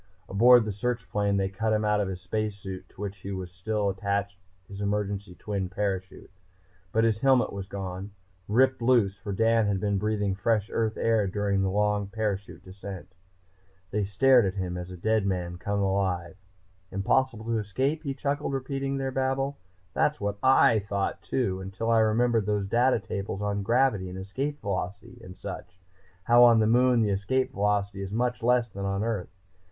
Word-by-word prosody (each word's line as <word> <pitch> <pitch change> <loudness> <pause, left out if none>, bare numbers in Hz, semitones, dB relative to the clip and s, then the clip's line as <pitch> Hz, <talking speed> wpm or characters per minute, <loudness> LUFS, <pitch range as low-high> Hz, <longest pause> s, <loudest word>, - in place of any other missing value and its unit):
Aboard 120 +3 +6
the 105 - -2
search 115 +1 -2
plane 100 0 +1
they 95 -1 +1
cut 110 +3 -1
him 110 0 +1
out 105 0 +2
of 100 - -1
the 95 - -3
space 105 +3 -3
suit 95 -2 -8
to - - -13
which 100 -1 -6
was 95 -2 -5
still 105 +3 -2
attached 100 +1 -1 0.3
his 100 0 -8
emergency 100 -2 -2
twin 100 -2 -3
parachute. 95 0 -4 0.6
But 110 - +2
his 110 -2 +2
helmet 130 0 +3
was 100 -1 -5
gone, 95 -1 -5 0.4
ripped 130 +4 +3
loose, 115 -5 +3
for 105 - -5
Dan 115 +2 +3
had 100 -2 0
been 100 0 0
breathing 105 -1 0
fresh 105 +2 0
Earth 110 -1 0
air 110 -3 +2
during 100 0 0
the 95 - +1
long 105 0 +1
parachute 100 -2 -3
descent. 95 0 -9 0.8
They 105 0 0
stared 120 +6 +4
at 95 - -3
him 90 -2 -3
as 90 0 -6
at 90 - -8
a - - -21
dead 110 -2 +2
man 90 -2 -2
come 100 +3 -2
alive. 95 -3 -1 0.5
"Impossible 110 +4 0
to 115 -1 0
escape?" 130 +10 -1
He 140 -3 -4
chuckled, 145 +1 -2
repeating 135 +1 -2
their 135 -1 -2
babble. 135 +1 -1 0.3
"That's 150 - +1
what 100 0 -3
I 130 -4 +5
thought 100 -1 -2
too, 95 +1 -1
until 95 +4 -3
I 115 - +5
remembered 110 0 +2
those 105 -1 0
data 120 +5 +3
tables 100 -1 -4
on 100 0 -1
gravity 110 -3 +2
and 90 - -7
Escape 135 +10 -4
Velocity 100 +5 -4
and 90 -2 -11
such 90 0 -8 0.4
how, 120 +3 +6
on 120 -1 +7
the 110 - +3
Moon, 120 +1 +4
the 105 - +1
Escape 130 +7 0
Velocity 100 -2 0
is 100 - -4
much 125 +3 -1
less 120 0 +3
than 100 -2 -7
on 100 +1 -1
Earth. 110 -6 -2
105 Hz, 185 wpm, -27 LUFS, 95-115 Hz, 0.8 s, on